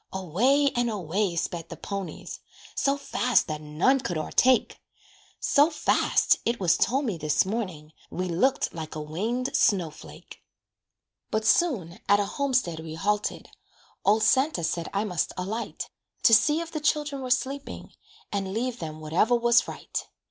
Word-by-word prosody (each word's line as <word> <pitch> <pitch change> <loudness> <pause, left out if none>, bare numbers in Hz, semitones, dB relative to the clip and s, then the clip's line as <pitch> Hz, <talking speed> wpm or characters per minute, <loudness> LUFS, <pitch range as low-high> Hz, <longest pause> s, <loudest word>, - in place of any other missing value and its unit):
Away, 240 - +2
and 240 0 +1
away 190 -2 -1
sped 170 -1 -3
the - - -8
ponies, 195 -5 -6 0.3
So 275 0 +1
fast 250 -3 +1
that 155 -1 -5
none 155 - +2
could 175 -9 -3
o'ertake 250 +10 +2 0.6
So 290 +3 +4
fast 305 - +2
(it 235 0 -1
was 180 -3 +3
told 270 +8 +1
me 200 -9 -2
this 155 +2 +2
morning), 185 -8 -4 0.2
We 185 +1 -3
looked 185 +11 +1
like 160 -1 -7
a - - -4
winged 215 - -2
snow 180 -6 +2
flake. 155 - -13 0.9
But 220 0 -1
soon 205 - +1
at 205 0 +6
a 205 - +1
homestead 255 - -1
we 160 0 -7
halted, 205 +5 -1 0.5
Old 215 +2 +3
Santa 260 - +2
said 165 0 -2
I 200 +1 0
must 180 -6 -2
alight, 210 +6 -4 0.4
To 225 - +6
see 295 +8 +5
if 335 -1 -7
the 310 - -3
children 295 -1 0
were 255 - -5
sleeping, 270 +3 -2 0.4
And 195 -1 -3
leave 245 +1 -2
them 155 -1 -6
whatever 170 +10 +2
was 235 0 +3
right. - - -5
210 Hz, 155 wpm, -26 LUFS, 170-255 Hz, 0.9 s, at